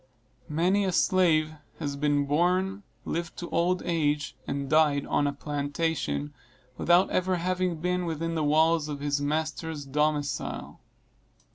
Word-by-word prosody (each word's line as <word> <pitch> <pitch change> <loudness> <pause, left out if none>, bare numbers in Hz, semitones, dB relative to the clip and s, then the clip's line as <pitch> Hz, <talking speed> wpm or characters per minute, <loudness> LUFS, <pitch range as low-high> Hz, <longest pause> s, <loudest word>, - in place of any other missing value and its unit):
Many 180 +6 +2
a 190 - 0
slave 165 -4 +3 0.2
has 145 -3 -3
been 145 0 +1
born, 180 +6 +1 0.2
lived 170 +1 -3
to 175 - -6
old 180 +2 +1
age, 150 -3 0
and 140 0 -2
died 150 -1 +3
on 145 - +1
a - - +1
plantation, 145 +1 -2 0.4
without 175 +6 +3
ever 185 0 +1
having 180 0 -1
been 180 +2 -1
within 165 +1 -2
the 160 -2 0
walls 155 +1 +3
of 145 -1 -4
his 145 0 -1
master's 155 0 -2
domicile. 150 +1 -2
155 Hz, 135 wpm, -27 LUFS, 145-175 Hz, 0.4 s, slave